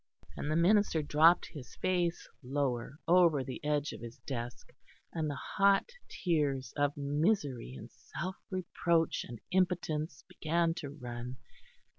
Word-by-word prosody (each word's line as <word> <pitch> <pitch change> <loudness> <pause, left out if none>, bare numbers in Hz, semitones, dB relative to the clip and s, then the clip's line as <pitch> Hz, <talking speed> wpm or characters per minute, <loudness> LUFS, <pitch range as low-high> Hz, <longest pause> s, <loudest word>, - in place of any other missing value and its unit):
And 150 - -3
the 155 - +1
minister 175 -1 +4
dropped 160 +4 +5
his 130 -7 -9
face 175 -2 0
lower, 135 -1 -2
over 170 -5 +5
the 130 +2 -7
edge 150 0 0
of - - -9
his 120 0 -8
desk; 120 -3 -5 0.4
and 160 -2 -1
the 145 - -3 0.2
hot 200 - +5 0.2
tears 145 - 0
of 145 0 +1
misery 145 - 0
and - - -10
self 185 +3 -6
reproach 170 -3 +1
and 120 -2 -8
impotence 165 -5 0
began 165 +1 +1
to 145 - -5
run. 125 -3 -6
150 Hz, 135 wpm, -32 LUFS, 135-170 Hz, 0.4 s, dropped